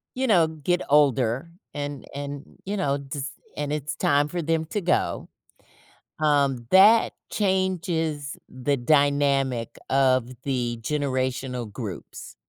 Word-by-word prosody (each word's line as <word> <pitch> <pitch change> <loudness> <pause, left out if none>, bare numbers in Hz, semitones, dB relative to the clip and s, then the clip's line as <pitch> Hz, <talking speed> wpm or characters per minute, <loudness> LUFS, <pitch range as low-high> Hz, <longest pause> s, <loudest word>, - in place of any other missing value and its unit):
you 260 - 0
know, 175 -8 +5
get 160 +3 -1
older, 135 -1 +3 0.2
and, 145 -1 -5
and 145 0 -5 0.2
you 200 - -2
know, 140 -6 +1
just, 140 0 -5 0.2
and 145 0 -3
it's 150 0 -3
time 145 +1 +2
for 175 +3 -3
them 160 0 0
to 205 +5 -3
go, 175 - 0 0.9
um, 140 -6 +2
that 210 +4 +6 0.2
changes 175 -7 -1
the 130 +3 -1
dynamic 140 -2 +2
of 130 -2 +3
the 120 -4 -1
generational 130 -4 -2
groups. 105 -6 -7
145 Hz, 120 wpm, -25 LUFS, 130-160 Hz, 0.9 s, that